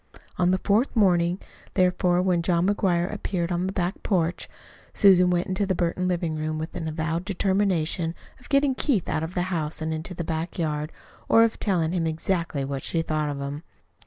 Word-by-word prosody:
On 180 Hz, 0 st, +3 dB
the 185 Hz, -, +3 dB
fourth 215 Hz, +8 st, +1 dB
morning, 175 Hz, -4 st, +3 dB, 0.4 s
therefore, 180 Hz, -1 st, +2 dB
when 180 Hz, -2 st, +2 dB
John 170 Hz, 0 st, +1 dB
McGuire 185 Hz, -3 st, +1 dB
appeared 180 Hz, -4 st, -2 dB
on 175 Hz, +1 st, 0 dB
the -, -, -2 dB
back 180 Hz, 0 st, -2 dB
porch, 175 Hz, -4 st, -1 dB, 0.5 s
Susan 180 Hz, -3 st, +6 dB
went 175 Hz, -1 st, +1 dB
into 190 Hz, +1 st, -1 dB
the 190 Hz, -, +1 dB
Burton 175 Hz, +1 st, 0 dB
living 170 Hz, -3 st, -1 dB
room 155 Hz, 0 st, -2 dB
with 160 Hz, +1 st, -4 dB
the 175 Hz, -, -5 dB
avowed 160 Hz, +2 st, -2 dB
determination 185 Hz, -4 st, 0 dB, 0.2 s
of 250 Hz, -, -17 dB
getting 275 Hz, -1 st, +3 dB
Keith 255 Hz, -, 0 dB
out -, -, -1 dB
of 160 Hz, +3 st, -5 dB
the 180 Hz, -, +1 dB
house 155 Hz, -2 st, -2 dB
and 160 Hz, 0 st, -2 dB
into 160 Hz, +3 st, -5 dB
the 170 Hz, -, -3 dB
back 160 Hz, +1 st, -3 dB
yard, 155 Hz, -2 st, -2 dB, 0.4 s
or 225 Hz, -, +7 dB
of 230 Hz, -, 0 dB
telling 170 Hz, -6 st, +1 dB
him 170 Hz, -2 st, 0 dB
exactly 160 Hz, -3 st, -1 dB
what 135 Hz, 0 st, -4 dB
she 165 Hz, -1 st, -1 dB
thought 155 Hz, -2 st, -1 dB
of 140 Hz, -1 st, -4 dB
him. 140 Hz, +2 st, -5 dB
175 Hz, 195 wpm, -25 LUFS, 160-190 Hz, 0.5 s, or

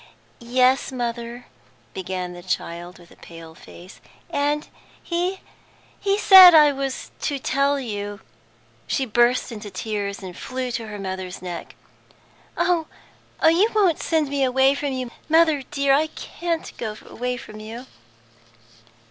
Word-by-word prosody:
"Yes, 255 Hz, +3 st, +2 dB
mother," 240 Hz, -1 st, -4 dB, 0.5 s
began 185 Hz, -1 st, -4 dB
the 175 Hz, -, -10 dB
child, 175 Hz, 0 st, -4 dB
with 175 Hz, -1 st, -18 dB
pale 165 Hz, -1 st, -12 dB
face, 175 Hz, +3 st, -14 dB, 0.3 s
"and 290 Hz, +1 st, 0 dB, 0.4 s
he 360 Hz, +2 st, -2 dB, 0.6 s
he 395 Hz, 0 st, +1 dB
said 375 Hz, -4 st, +10 dB
I 300 Hz, -2 st, +7 dB
was 275 Hz, -1 st, -4 dB
to 285 Hz, -, -1 dB
tell 275 Hz, +1 st, +1 dB
you 205 Hz, -4 st, -5 dB, 0.3 s
" 115 Hz, 0 st, -34 dB
She 270 Hz, -, 0 dB
burst 240 Hz, +2 st, +2 dB
into 210 Hz, -2 st, -7 dB
tears, 205 Hz, -1 st, -4 dB
and 180 Hz, -2 st, -8 dB
flew 255 Hz, +3 st, -4 dB
to 230 Hz, -2 st, -4 dB
her 210 Hz, -1 st, -7 dB
mother's 190 Hz, -2 st, -5 dB
neck. 175 Hz, -1 st, -7 dB, 0.8 s
"Oh, 340 Hz, -3 st, +1 dB, 0.6 s
you 335 Hz, +7 st, +5 dB
won't 380 Hz, -7 st, +3 dB
send 320 Hz, -3 st, +1 dB
me 280 Hz, -1 st, 0 dB
away 265 Hz, +1 st, +4 dB
from 280 Hz, 0 st, -3 dB
you, 255 Hz, -2 st, -4 dB, 0.2 s
mother 320 Hz, -2 st, +4 dB
dear? 280 Hz, -1 st, +2 dB
I 305 Hz, +3 st, +3 dB
can't 335 Hz, +1 st, -5 dB
go 215 Hz, -2 st, -4 dB
away 250 Hz, +1 st, -4 dB
from 215 Hz, -2 st, -10 dB
you!" 225 Hz, +4 st, -8 dB
250 Hz, 140 wpm, -23 LUFS, 205-290 Hz, 0.8 s, said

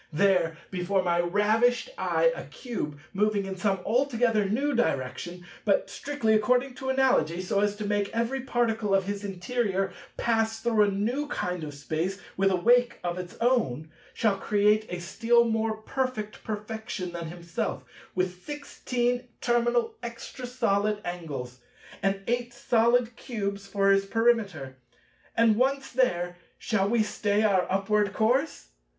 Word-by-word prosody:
There, 170 Hz, -1 st, +2 dB
before 185 Hz, +1 st, 0 dB
my 175 Hz, -1 st, +1 dB
ravished 215 Hz, -, +2 dB
eye, -, -, +2 dB
a -, -, -7 dB
Cube 185 Hz, -, -5 dB, 0.2 s
moving 205 Hz, 0 st, +1 dB
in 190 Hz, 0 st, -4 dB
some 195 Hz, 0 st, 0 dB
altogether 230 Hz, -4 st, +2 dB
new 280 Hz, +7 st, +1 dB
direction, 175 Hz, -, -2 dB, 0.2 s
but 200 Hz, -1 st, +1 dB
strictly 255 Hz, -2 st, 0 dB
according 250 Hz, +5 st, +2 dB
to 265 Hz, 0 st, -4 dB
Analogy, 260 Hz, -11 st, +2 dB
so 185 Hz, +2 st, 0 dB
as 205 Hz, 0 st, +1 dB
to 210 Hz, 0 st, -5 dB
make 205 Hz, -1 st, 0 dB
every 235 Hz, +4 st, -1 dB
particle 225 Hz, -5 st, +1 dB
of 195 Hz, -, +3 dB
his 200 Hz, +1 st, -4 dB
interior 195 Hz, 0 st, -1 dB, 0.2 s
pass 225 Hz, -1 st, +1 dB
through 225 Hz, -1 st, +2 dB
a 205 Hz, -, +5 dB
new 235 Hz, +9 st, -1 dB
kind 180 Hz, -, -3 dB
of 145 Hz, -2 st, -6 dB
Space, 160 Hz, +7 st, -2 dB, 0.2 s
with 195 Hz, 0 st, +3 dB
a 190 Hz, -, +2 dB
wake 245 Hz, +6 st, +3 dB
of 175 Hz, 0 st, -2 dB
its 180 Hz, -1 st, -8 dB
own—shall 200 Hz, -, 0 dB
create 210 Hz, +1 st, +2 dB
a 180 Hz, -, -4 dB
still 230 Hz, +7 st, +3 dB
more 225 Hz, -1 st, 0 dB
perfect 220 Hz, -1 st, -3 dB
perfection 215 Hz, -3 st, -5 dB
than 170 Hz, -1 st, -5 dB
himself, 170 Hz, 0 st, -4 dB, 0.3 s
with 185 Hz, -1 st, -2 dB
sixteen 250 Hz, -4 st, -2 dB
terminal 240 Hz, 0 st, +1 dB
Extra 235 Hz, +1 st, -7 dB
solid 215 Hz, -4 st, +1 dB
angles, 145 Hz, -8 st, -5 dB, 0.4 s
and 195 Hz, 0 st, 0 dB
Eight 240 Hz, 0 st, -1 dB
solid 235 Hz, 0 st, +2 dB
Cubes 200 Hz, -5 st, -4 dB
for 195 Hz, 0 st, +3 dB
his 195 Hz, 0 st, +3 dB
Perimeter. 200 Hz, -, +1 dB, 0.6 s
And 225 Hz, -2 st, +5 dB
once 270 Hz, +2 st, +1 dB
there, 175 Hz, -9 st, +1 dB, 0.2 s
shall 200 Hz, -3 st, 0 dB
we 230 Hz, -1 st, +3 dB
stay 210 Hz, 0 st, 0 dB
our 190 Hz, -4 st, +2 dB
upward 205 Hz, +1 st, +1 dB
course? 245 Hz, -, +1 dB
210 Hz, 145 wpm, -27 LUFS, 190-240 Hz, 0.6 s, a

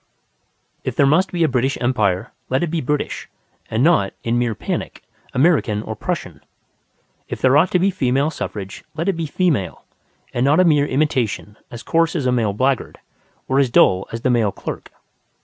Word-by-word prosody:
If -, -, -3 dB
there 140 Hz, -, +4 dB
must 160 Hz, +7 st, +3 dB
be 175 Hz, -2 st, 0 dB
a -, -, +4 dB
British 135 Hz, 0 st, 0 dB
Empire, 110 Hz, -4 st, 0 dB, 0.2 s
let 130 Hz, +5 st, +1 dB
it 170 Hz, -, -2 dB
be 165 Hz, -2 st, -1 dB
British, 150 Hz, +3 st, -3 dB, 0.4 s
and 110 Hz, +3 st, 0 dB
not, 155 Hz, -, +3 dB
in 120 Hz, +1 st, +1 dB
mere 120 Hz, -3 st, 0 dB
panic, -, -, -4 dB, 0.3 s
American 130 Hz, -8 st, +2 dB
or -, -, -5 dB
Prussian. -, -, -4 dB, 0.9 s
If -, -, -5 dB
there 130 Hz, +1 st, +4 dB
ought 165 Hz, +5 st, +5 dB
to -, -, +2 dB
be 190 Hz, +2 st, +2 dB
female 140 Hz, -3 st, +1 dB
suffrage, 100 Hz, -10 st, -6 dB
let 165 Hz, +3 st, -2 dB
it 195 Hz, -, +3 dB
be 165 Hz, -2 st, -3 dB
female, 145 Hz, -, -1 dB, 0.5 s
and 120 Hz, -, 0 dB
not 145 Hz, +5 st, +4 dB
a 185 Hz, -, +5 dB
mere 150 Hz, -3 st, +3 dB
imitation 130 Hz, -7 st, -1 dB
as 120 Hz, -, -9 dB
coarse 165 Hz, 0 st, +1 dB
as 145 Hz, -6 st, -1 dB
the 125 Hz, -, +2 dB
male 115 Hz, -4 st, +1 dB
blackguard 130 Hz, +4 st, 0 dB, 0.5 s
or 135 Hz, +1 st, +2 dB
as 135 Hz, -3 st, +3 dB
dull 95 Hz, -5 st, +4 dB
as 115 Hz, -, -5 dB
the 130 Hz, -, +1 dB
male 115 Hz, -4 st, +2 dB
clerk. -, -, -7 dB
130 Hz, 185 wpm, -20 LUFS, 115-160 Hz, 0.9 s, ought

